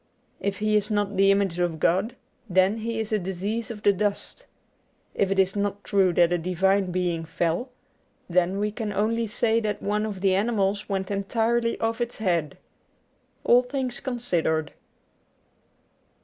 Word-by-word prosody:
If 200 -1 -2
he 215 +1 +1
is 210 0 +1
not 205 -1 0
the 195 +1 +4
image 195 -3 +2
of 175 -3 0
God, 190 +11 +1 0.3
then 190 +4 +3
he 225 0 -3
is 220 -1 -3
a 215 - +2
disease 195 +5 -3
of 210 -3 -8
the 205 - +5
dust. 205 - -3 0.7
If 195 - +1
it 195 - 0
is 190 0 +2
not 205 0 -2
true 195 -3 +3
that 175 0 +4
a 175 - +1
divine 190 +3 +1
being 175 -2 -1
fell, 165 - -1 0.6
then 180 +2 +1
we 210 +1 0
can 215 -1 -4
only 220 +3 0
say 225 +2 +1
that 215 -2 -2
one 210 +1 -1
of 200 -3 -6
the 190 -1 +3
animals 200 0 0
went 190 0 -2
entirely 230 +4 0
off 225 +1 -1
its 240 0 -3
head. 170 -8 -1 0.9
^All 245 +1 +4
Things 260 -3 -3
Considered. 170 - -1
200 Hz, 165 wpm, -25 LUFS, 185-220 Hz, 0.9 s, the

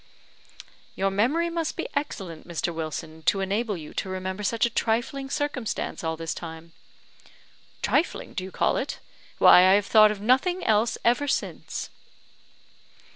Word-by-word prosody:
"Your 195 0 0
memory 290 - +1
must 330 -2 -2
be - - -3
excellent, 195 - -4
Mr. 170 0 -2
Wilson, 160 0 -5
to 195 - +4
enable 200 +2 -1
you 155 -2 -10
to 190 - -3
remember 185 +1 -4
such 225 +3 +1
a - - 0
trifling 240 +6 -1
circumstance 280 - -3
all 160 0 -2
this 165 0 -3
time." 165 0 -9 1.1
"Trifling, - - 0
do 185 - -3
you 190 - -6
call - - +1
it? - - -3 0.4
Why, - - +8
I 185 +1 +6
have 205 0 +3
thought 215 0 +6
of 210 -1 -4
nothing 270 - +2
else 220 +1 +2
ever 245 +5 +3
since." - - -3
205 Hz, 150 wpm, -26 LUFS, 180-245 Hz, 1.1 s, Why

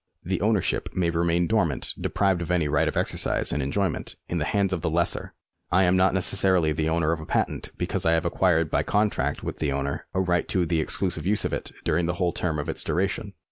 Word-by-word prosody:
The - - -2
ownership - - +1
may 85 -2 +1
remain 85 +1 +1
dormant, 85 -9 +1
deprived 95 -3 +1
of 85 - -4
any 85 -4 +2
right 75 0 +2
of - - -2
exercise - - +1
and 75 - -1
enjoyment, 95 +9 -2
in 85 - -2
the 75 - -1
hands 100 0 +1
of 90 - -2
the - - 0
lessor. 85 +2 0 0.4
I 95 +2 +4
am 90 0 +3
not 95 +1 +3
necessarily 95 -3 +2
the 80 +1 0
owner 80 -1 +1
of 85 - -1
a 80 - -8
patent, - - -1
because - - -2
I 80 - +3
have 85 +1 +1
acquired 85 -2 +2
by - - +2
contract 105 0 0
with - - -4
the 75 -2 -1
owner 70 0 -3
a - - +2
right 90 -2 +1
to 90 -2 +1
the 80 -1 +1
exclusive 90 +3 -2
use 105 +1 +1
of - - -2
it - - -3
during 85 +2 +1
the 90 - -1
whole 90 -1 0
term 80 -3 -1
of 75 +1 -3
its 80 - -1
duration. 100 +2 -1
85 Hz, 230 wpm, -25 LUFS, 80-95 Hz, 0.4 s, I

